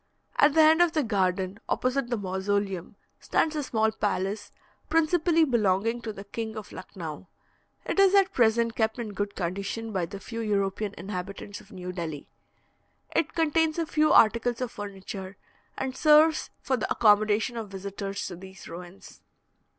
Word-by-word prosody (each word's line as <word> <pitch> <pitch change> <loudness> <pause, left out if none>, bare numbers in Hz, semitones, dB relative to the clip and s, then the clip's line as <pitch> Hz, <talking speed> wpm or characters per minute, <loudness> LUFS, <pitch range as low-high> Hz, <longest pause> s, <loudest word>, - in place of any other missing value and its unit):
At 315 - +5
the 320 - +7
end 320 +2 +6
of 345 -2 +4
the 310 - +1
garden, 190 -2 0
opposite 255 0 0
the 240 - 0
mausoleum, 195 -1 -2 0.2
stands 315 -1 0
a 300 - 0
small 220 -5 +1
palace, 205 -1 -2 0.4
principally 330 0 +3
belonging 230 -2 +1
to 225 - -4
the 200 -1 -9
King 220 +2 -5
of 215 - -8
Lucknau. 170 -3 -8 0.6
It - - -1
is 395 0 +6
at 390 -1 +4
present 230 -1 +2
kept 220 0 0
in 225 -4 -5
good 205 +1 -3
condition 200 +5 -3
by 180 -3 -1
the 200 +1 -8
few 230 +4 -7
European 205 -1 -1
inhabitants 195 +2 -6
of - - -20
New 180 -1 -6
Delhi. 165 -5 -5 0.9
It 320 - +1
contains 320 0 +2
a 335 - 0
few 305 0 +2
articles 235 +2 +4
of 250 -2 -3
furniture, 195 -1 -7 0.4
and 265 -1 -3
serves 310 +1 +5
for 265 - +1
the 215 - -3
accommodation 215 +1 +3
of 225 -3 -5
visitors 195 +1 -5
to 180 - -5
these 190 +2 -12
ruins. 175 +2 -11
215 Hz, 160 wpm, -27 LUFS, 195-255 Hz, 0.9 s, the